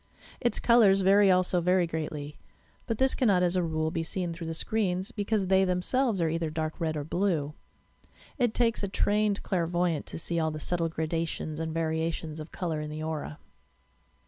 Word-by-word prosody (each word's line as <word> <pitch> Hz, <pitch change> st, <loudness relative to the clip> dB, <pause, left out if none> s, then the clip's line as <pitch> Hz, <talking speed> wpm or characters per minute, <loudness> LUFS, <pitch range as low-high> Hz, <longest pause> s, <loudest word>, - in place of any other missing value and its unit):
Its 240 Hz, -, 0 dB
colours 215 Hz, -5 st, +5 dB
vary 195 Hz, +1 st, +5 dB
also 185 Hz, -1 st, +3 dB
very 180 Hz, +1 st, +3 dB
greatly, 150 Hz, -3 st, -5 dB, 0.5 s
but 230 Hz, -, -1 dB
this 265 Hz, +2 st, +3 dB
cannot 200 Hz, -8 st, +3 dB
as 180 Hz, 0 st, +2 dB
a 180 Hz, -, +2 dB
rule 160 Hz, -1 st, -1 dB
be 165 Hz, -, -2 dB
seen 175 Hz, +1 st, -3 dB
through 165 Hz, 0 st, -7 dB
the 165 Hz, -, -3 dB
screens 190 Hz, +1 st, -1 dB
because 205 Hz, -2 st, -1 dB
they 190 Hz, +1 st, +4 dB
themselves 190 Hz, +5 st, +1 dB
are 165 Hz, -, +2 dB
either 165 Hz, 0 st, -1 dB
dark 155 Hz, 0 st, -3 dB
red 160 Hz, -2 st, -1 dB
or 145 Hz, -, -3 dB
blue. 160 Hz, -3 st, -1 dB, 0.9 s
It 240 Hz, -3 st, +1 dB
takes 230 Hz, -2 st, +2 dB
a 200 Hz, -, -1 dB
trained 205 Hz, +1 st, +1 dB
clairvoyant 175 Hz, -3 st, 0 dB
to -, -, -7 dB
see 170 Hz, +1 st, -2 dB
all 160 Hz, -1 st, +1 dB
the 155 Hz, 0 st, -5 dB
subtle 165 Hz, +1 st, 0 dB
gradations 160 Hz, -1 st, -3 dB
and 160 Hz, 0 st, -3 dB
variations 160 Hz, -1 st, -2 dB
of 155 Hz, +1 st, -8 dB
colour 165 Hz, -4 st, -3 dB
in 150 Hz, -, -5 dB
the 155 Hz, +1 st, -5 dB
aura. 155 Hz, -1 st, -4 dB
170 Hz, 185 wpm, -28 LUFS, 160-195 Hz, 0.9 s, colours